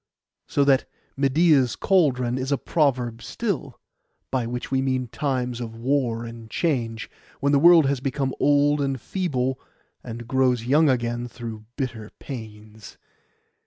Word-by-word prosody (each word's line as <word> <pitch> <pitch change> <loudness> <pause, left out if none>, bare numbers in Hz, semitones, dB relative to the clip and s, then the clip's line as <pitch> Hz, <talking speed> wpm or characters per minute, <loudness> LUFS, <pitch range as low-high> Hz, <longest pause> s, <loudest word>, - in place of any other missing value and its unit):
So 145 - +2
that 135 -2 +3 0.3
'Medeia's 140 -1 +3
cauldron' 130 -9 +2
is 130 +2 -3
a 140 - +3
proverb 125 -8 0
still, 165 - -4 0.5
by 125 -3 0
which 125 +2 -5
we 130 -1 +2
mean 130 -1 0
times 125 -3 -2
of 115 -1 -6
war 120 -1 0
and 115 -1 -10
change, 115 -7 -1 0.3
when 140 0 +1
the 140 - +4
world 170 0 +7
has 135 -1 +1
become 135 0 -2
old 145 0 +3
and 135 -2 -1
feeble, 130 - -2 0.4
and 120 -1 -7
grows 130 -2 +2
young 145 +5 +4
again 120 -1 -1
through 115 -3 -8
bitter 115 -6 -4
pains. 110 -4 -10
130 Hz, 140 wpm, -24 LUFS, 120-140 Hz, 0.5 s, world